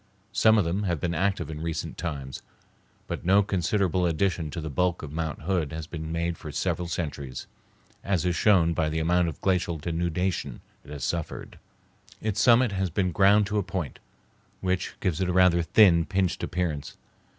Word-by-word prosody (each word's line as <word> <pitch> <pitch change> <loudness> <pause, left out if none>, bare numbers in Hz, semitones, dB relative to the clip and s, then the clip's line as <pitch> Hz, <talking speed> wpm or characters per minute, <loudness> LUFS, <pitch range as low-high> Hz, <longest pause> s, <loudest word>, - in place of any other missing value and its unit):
Some 110 +1 +5
of 100 - +3
them 90 +5 -1
have 90 -6 -1
been 85 +2 -1
active 95 -1 0
in 75 0 -6
recent 80 -1 -3
times, 70 -6 -5 0.6
but - - -5
no 100 +3 +4
considerable 95 -1 +1
addition 85 -1 0
to 85 - -5
the 80 -1 -5
bulk 90 +4 0
of 75 - -6
Mount 80 -1 -4
Hood 85 -4 0
has 80 -1 -5
been 80 0 -6
made 85 0 -2
for 75 - -7
several 85 +3 -1
centuries, 70 -6 -4 0.6
as 95 -3 0
is 90 -1 +1
shown 85 -3 +4
by 80 -2 0
the 80 - -3
amount 85 +2 +2
of 80 - -5
glacial 90 -3 +1
denudation 85 +3 -2 0.2
it 70 - -16
has 75 -1 -6
suffered. 85 -2 -4 0.6
Its 105 -1 -1
summit 120 -1 +5
has 95 -1 -1
been 90 +2 0
ground 100 +3 +5
to 105 +1 -1
a - - +1
point, 90 -6 -4 0.6
which 95 -1 -2
gives 90 -2 -1
it 90 - 0
a - - 0
rather 90 -1 +5
thin, 85 -2 +5
pinched 95 -1 0
appearance. 80 -5 -3
85 Hz, 185 wpm, -26 LUFS, 80-95 Hz, 0.6 s, Some